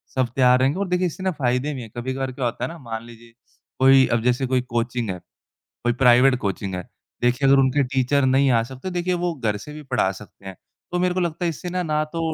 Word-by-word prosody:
सब 130 Hz, -2 st, +2 dB
तैयार 125 Hz, -1 st, +5 dB
रहेंगे 135 Hz, +7 st, +1 dB
और 200 Hz, -, -1 dB
देखिए 180 Hz, 0 st, +1 dB
इससे 180 Hz, +3 st, -7 dB
ना 190 Hz, -, +1 dB
फ़ायदे 125 Hz, +4 st, 0 dB
भी 130 Hz, -, -6 dB
हैं 115 Hz, -, -9 dB
कभी-कभार 130 Hz, +2 st, -3 dB
क्या 125 Hz, 0 st, -4 dB
होता 120 Hz, -, -3 dB
है -, -, 0 dB
ना 170 Hz, -, -9 dB
मान 115 Hz, -4 st, -6 dB
लीजिए 115 Hz, 0 st, -15 dB, 0.5 s
कोई 135 Hz, 0 st, +6 dB
अब -, -, -3 dB
जैसे 125 Hz, +2 st, +1 dB
कोई 125 Hz, -, +3 dB, 0.2 s
कोचिंग 120 Hz, -1 st, -1 dB
है 90 Hz, -1 st, -4 dB, 0.6 s
कोई 120 Hz, 0 st, +2 dB
प्राइवेट 125 Hz, +2 st, +6 dB
कोचिंग 100 Hz, -3 st, -3 dB
है। 90 Hz, -, -6 dB, 0.3 s
देखिए 125 Hz, +3 st, +2 dB
अगर 135 Hz, +1 st, +6 dB
उनके 135 Hz, +1 st, +3 dB
टीचर 130 Hz, +2 st, +1 dB
नहीं 135 Hz, +1 st, +3 dB
आ 115 Hz, -2 st, +3 dB
सकते 130 Hz, +8 st, -9 dB
तो 180 Hz, -, -7 dB
देखिए 180 Hz, +1 st, -1 dB
वो 175 Hz, -, 0 dB
घर 110 Hz, -7 st, -1 dB
से 150 Hz, +9 st, -10 dB
भी 150 Hz, 0 st, -9 dB
पढ़ा 125 Hz, -8 st, 0 dB
सकते 100 Hz, 0 st, -14 dB
हैं। 95 Hz, -1 st, -7 dB, 0.4 s
तो 180 Hz, -, -1 dB
मेरे 180 Hz, 0 st, +1 dB
को 185 Hz, -, -1 dB
लगता 175 Hz, 0 st, -2 dB
है 170 Hz, -, +2 dB
इससे 165 Hz, +3 st, -6 dB
ना, 180 Hz, 0 st, -2 dB
ना 155 Hz, -2 st, 0 dB
तो 160 Hz, +1 st, -3 dB
130 Hz, 255 wpm, -22 LUFS, 120-155 Hz, 0.6 s, कोई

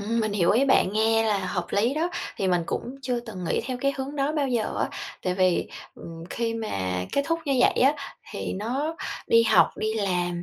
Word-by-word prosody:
Ừm, 230 Hz, +3 st, 0 dB
mình 215 Hz, -2 st, -1 dB
hiểu 180 Hz, -4 st, +3 dB
ý 245 Hz, +6 st, +4 dB
bạn, 265 Hz, -8 st, +3 dB
nghe 225 Hz, +1 st, +3 dB
là 210 Hz, -2 st, +2 dB
hợp 180 Hz, -2 st, -2 dB
lý 230 Hz, +7 st, +2 dB
đó. 330 Hz, +3 st, 0 dB, 0.3 s
Thì 190 Hz, -, 0 dB
mình 175 Hz, -2 st, +2 dB
cũng -, -, -2 dB, 0.2 s
chưa 250 Hz, -2 st, -1 dB
từng 215 Hz, -6 st, -7 dB
nghĩ -, -, 0 dB
theo 255 Hz, -, -2 dB
cái 275 Hz, +1 st, +2 dB
hướng 275 Hz, +2 st, -5 dB
đó 280 Hz, +1 st, +1 dB
bao 290 Hz, -3 st, 0 dB
giờ 235 Hz, -4 st, -1 dB
á, -, -, +1 dB, 0.3 s
tại 180 Hz, 0 st, 0 dB
vì, 185 Hz, -2 st, +2 dB, 0.3 s
ừm, 165 Hz, 0 st, -9 dB
khi 230 Hz, -1 st, -1 dB
mà 95 Hz, -, -2 dB
kết 280 Hz, -, +2 dB
thúc 330 Hz, 0 st, +1 dB
như 280 Hz, -, 0 dB
vậy -, -, +5 dB
á 275 Hz, +3 st, +5 dB, 0.4 s
thì 200 Hz, -, -4 dB
nó 265 Hz, +11 st, -2 dB, 0.3 s
đi 230 Hz, 0 st, +5 dB
học, 230 Hz, -, +5 dB
đi 215 Hz, 0 st, -1 dB
làm, 180 Hz, -4 st, -1 dB
220 Hz, 225 wpm, -26 LUFS, 185-265 Hz, 0.4 s, vậy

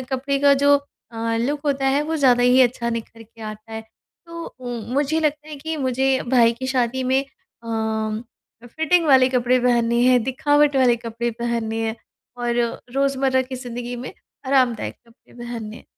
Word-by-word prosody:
कपड़े 275 Hz, +1 st, -1 dB
का 280 Hz, 0 st, +5 dB
जो 285 Hz, +1 st, +4 dB, 0.4 s
अ, 230 Hz, 0 st, -2 dB
लुक 285 Hz, +5 st, -1 dB
होता 275 Hz, -1 st, 0 dB
है, 275 Hz, +2 st, +2 dB
वो 320 Hz, +2 st, -2 dB
ज़्यादा 250 Hz, -4 st, +4 dB
ही 250 Hz, +1 st, +5 dB
अच्छा 235 Hz, -1 st, 0 dB
निखर 230 Hz, 0 st, -6 dB
के 225 Hz, +1 st, -20 dB
आता 215 Hz, +1 st, -8 dB
है। 220 Hz, -, -4 dB, 0.5 s
तो 335 Hz, 0 st, -7 dB, 0.2 s
उम, 245 Hz, -1 st, -6 dB
मुझे 295 Hz, +3 st, +1 dB
लगता 300 Hz, 0 st, -1 dB
है 305 Hz, -, -7 dB
कि 320 Hz, +3 st, -5 dB
मुझे 265 Hz, -1 st, 0 dB, 0.2 s
भाई 235 Hz, -3 st, +5 dB
की 255 Hz, +3 st, -6 dB
शादी 260 Hz, -1 st, 0 dB
में 265 Hz, +2 st, +1 dB, 0.4 s
अम्म 220 Hz, +1 st, -5 dB
फिटिंग 320 Hz, +5 st, +1 dB
वाले 260 Hz, -2 st, +6 dB
कपड़े 250 Hz, 0 st, +2 dB
पहनने 235 Hz, -1 st, +2 dB
हैं, 250 Hz, -2 st, +4 dB
दिखावट 290 Hz, +2 st, +2 dB
वाले 250 Hz, -2 st, +4 dB
कपड़े 235 Hz, +1 st, -4 dB
पहनने 235 Hz, -2 st, -2 dB
हैं, 220 Hz, -, -3 dB, 0.4 s
और 240 Hz, -1 st, -2 dB, 0.4 s
रोज़मर्रा 270 Hz, -1 st, +1 dB
की 260 Hz, 0 st, -7 dB
ज़िंदगी 245 Hz, -1 st, -6 dB
में 250 Hz, +7 st, -7 dB, 0.3 s
आरामदायक 255 Hz, -4 st, +1 dB
कपड़े 230 Hz, +2 st, -24 dB
पहनने 230 Hz, -2 st, -6 dB
हैं। -, -, -15 dB
250 Hz, 175 wpm, -22 LUFS, 235-275 Hz, 0.5 s, वाले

